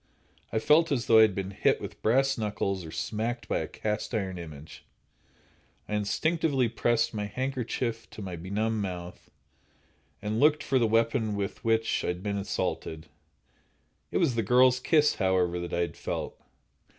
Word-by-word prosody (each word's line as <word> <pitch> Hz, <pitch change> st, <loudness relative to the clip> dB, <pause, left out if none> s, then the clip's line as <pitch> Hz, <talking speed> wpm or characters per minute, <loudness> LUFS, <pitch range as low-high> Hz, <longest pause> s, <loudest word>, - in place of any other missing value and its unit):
I -, -, 0 dB
felt 155 Hz, +8 st, +4 dB
as 125 Hz, -4 st, 0 dB
though 110 Hz, -1 st, +6 dB
I -, -, +9 dB
had 110 Hz, -4 st, +4 dB
been 95 Hz, -1 st, -3 dB
hit -, -, +2 dB
with -, -, -8 dB
brass 135 Hz, +4 st, +3 dB
knuckles 100 Hz, -4 st, -2 dB
or 80 Hz, -, -8 dB
smacked 115 Hz, +8 st, -3 dB
by -, -, 0 dB
a -, -, -3 dB
cast 105 Hz, +2 st, -3 dB
iron 95 Hz, -4 st, -2 dB
image. 80 Hz, -2 st, -10 dB, 1.0 s
I -, -, -5 dB
instinctively 135 Hz, +5 st, +1 dB
pressed 120 Hz, +1 st, +1 dB
my 105 Hz, -1 st, -2 dB
handkerchief 120 Hz, -1 st, -3 dB
to -, -, -10 dB
my 95 Hz, -2 st, -5 dB
benumbed 105 Hz, +6 st, -1 dB
mouth, 90 Hz, -2 st, -6 dB, 0.9 s
and 105 Hz, +2 st, -2 dB
looked 150 Hz, +2 st, +4 dB
for 130 Hz, -, +2 dB
the 115 Hz, -, +3 dB
weapon 115 Hz, -1 st, +1 dB
with 100 Hz, 0 st, -4 dB
which 115 Hz, 0 st, +1 dB
I -, -, -2 dB
had 90 Hz, +1 st, -3 dB
been 100 Hz, -1 st, -1 dB
assaulted. 80 Hz, -4 st, -3 dB, 1.0 s
It -, -, -1 dB
was 160 Hz, -8 st, +2 dB
the 115 Hz, -, +1 dB
girl's 125 Hz, +3 st, +4 dB
kiss, 150 Hz, +2 st, +3 dB
however, 90 Hz, -2 st, +1 dB
that 85 Hz, 0 st, -5 dB
I 85 Hz, -, 0 dB
had 85 Hz, -, -2 dB
felt. -, -, -4 dB
110 Hz, 170 wpm, -28 LUFS, 95-125 Hz, 1.0 s, I